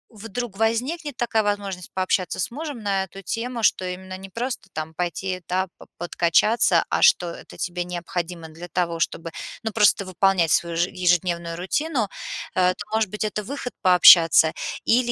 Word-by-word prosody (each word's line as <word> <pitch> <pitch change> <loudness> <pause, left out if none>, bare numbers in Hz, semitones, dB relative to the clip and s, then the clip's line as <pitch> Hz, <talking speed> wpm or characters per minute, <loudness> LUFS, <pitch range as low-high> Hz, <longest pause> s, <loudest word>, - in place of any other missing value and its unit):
вдруг 225 0 -6
возникнет 255 +6 -1
такая 225 -2 +1
возможность- 200 -3 -3
пообщаться 185 -1 0
с 185 - -1
мужем 285 -4 -6
на 195 -1 0
эту 195 +1 -12
тему, 235 +2 -3
что 190 - +3
именно 185 +1 -6
не 190 +1 -10
просто 235 -2 -4
там 155 +1 -5
пойти, 185 +2 -3
да, 185 +1 0
па - - -14
подкачаться, 175 +6 +2
а - - 0
что 180 - +4
это - - -12
тебе 175 0 -2
необходимо 175 -1 -5
для 165 +3 -10
того, 170 -1 -1
чтобы, 165 0 -2 0.3
ну, 220 - -2
просто 205 -2 +3
выполнять 185 -2 +2
свою 170 -1 +1
же 175 +1 +1
ежедневную 170 -2 0
рутину, 230 - -1 0.4
э, 185 0 +3
то, - - -7
может 220 -3 +1
быть, 210 +2 -4
это 210 0 -2
выход 255 +1 -6
пообщаться. 170 -4 +7 0.3
Или, 240 +1 +3
190 Hz, 165 wpm, -23 LUFS, 175-225 Hz, 0.4 s, пообщаться